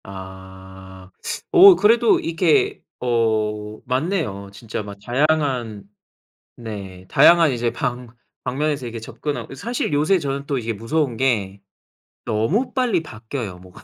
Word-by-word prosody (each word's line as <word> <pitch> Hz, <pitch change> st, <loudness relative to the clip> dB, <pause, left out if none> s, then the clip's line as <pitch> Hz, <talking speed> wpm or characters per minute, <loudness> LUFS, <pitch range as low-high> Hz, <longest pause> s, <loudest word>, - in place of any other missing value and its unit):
아. 95 Hz, 0 st, -11 dB, 0.4 s
어 385 Hz, -1 st, +9 dB
그래도 230 Hz, 0 st, +4 dB
이렇게 400 Hz, -, +1 dB, 0.2 s
어 110 Hz, -3 st, -1 dB
맞네요. 130 Hz, -, -2 dB
진짜 110 Hz, +1 st, -6 dB
막 100 Hz, -1 st, -9 dB
다양한 130 Hz, -6 st, 0 dB, 0.7 s
네 100 Hz, -5 st, -8 dB
다양한 170 Hz, -3 st, +6 dB
이제 120 Hz, -1 st, -1 dB
방 120 Hz, +1 st, -3 dB, 0.4 s
방면에서 140 Hz, +1 st, -1 dB
이렇게 115 Hz, -1 st, -6 dB
접근하고 140 Hz, +6 st, -5 dB
이 -, -, -8 dB
사실 235 Hz, -, -3 dB
요새 155 Hz, +6 st, +3 dB
저는 140 Hz, -2 st, -3 dB
또 140 Hz, -1 st, -1 dB
이게 115 Hz, -2 st, -2 dB
무서운 120 Hz, +4 st, -1 dB
게 100 Hz, -7 st, 0 dB, 0.6 s
너무 115 Hz, -, 0 dB
빨리 240 Hz, -10 st, +1 dB
바뀌어요, 110 Hz, -, -7 dB
뭐가. 90 Hz, +1 st, -15 dB
120 Hz, 260 characters per minute, -21 LUFS, 105-155 Hz, 0.7 s, 어